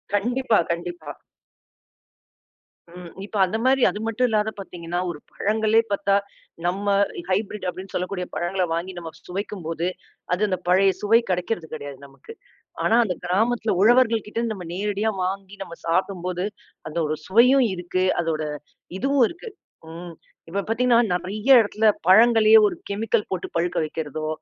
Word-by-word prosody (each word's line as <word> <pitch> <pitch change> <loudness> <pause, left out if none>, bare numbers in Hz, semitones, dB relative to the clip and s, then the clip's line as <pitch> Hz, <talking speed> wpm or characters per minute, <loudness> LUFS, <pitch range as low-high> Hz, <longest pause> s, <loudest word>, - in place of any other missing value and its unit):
கண்டிப்பா, 240 +2 +1
கண்டிப்பா. 170 -3 -5 1.8
ம். 180 -1 -9 0.2
இப்ப 210 - -6
அந்த 215 +5 -2
மாரி 265 0 +3
அது 210 - -5
மட்டும் 245 +3 +1
இல்லாத 215 0 +1
பார்த்தீங்கன்னா 175 -2 -5
ஒரு 155 -4 -6
பழங்களே 220 +2 +2
பார்த்தா, 200 0 +1 0.5
நம்ம 195 +3 -1 0.4
ஹைபிரிட் 200 +1 -2
அப்படின்னு 185 +2 -9
சொல்லக்கூடிய 180 0 -3
பழங்கள 180 +2 -1
வாங்கி 175 +3 -3
நம்ம 165 -2 -6 0.2
சுவைக்கும்போது, 180 -3 -4 0.5
அது 180 - -1
அந்த 185 -2 -1
பழைய 190 +2 +4
சுவை 225 +3 +5
கிடைக்கிறது 180 -1 -2
கெடையாது 145 -3 -7
நமக்கு. 290 - -14 0.5
ஆனா 225 - +3
அந்தக் 180 -4 -4
கிராமத்துல 220 +4 +1
உழவர்கள்கிட்டருந்து 230 -1 +2
நம்ம 180 -3 -8
நேரடியா 205 +3 -1
வாங்கி 195 +1 -5
நம்ம 170 -2 -10
சாப்பிடும்போது, 180 +1 -1 0.4
அந்த 160 - -7
ஒரு 155 - -1
சுவையும் 250 +6 +5
இருக்கு. 180 +1 -2 0.2
அதோட 160 -2 -2 0.6
இதுவும் 275 -2 +3
இருக்கு. 370 +7 -9 0.4
ம், 170 +1 -9 0.4
இப்ப 200 +3 -1
பாத்தீங்கன்னா 235 +1 +3
நெறையா 210 +9 +3
இடத்துல 215 +1 +1 0.2
பழங்களையே 220 +2 +7
ஒரு - - -3
கெமிக்கல் 215 +2 0
போட்டுப் 185 - -4
பழுக்க 175 +1 -1
வைக்கிறதோ, 155 0 -5
195 Hz, 135 wpm, -23 LUFS, 175-220 Hz, 1.8 s, பழங்களையே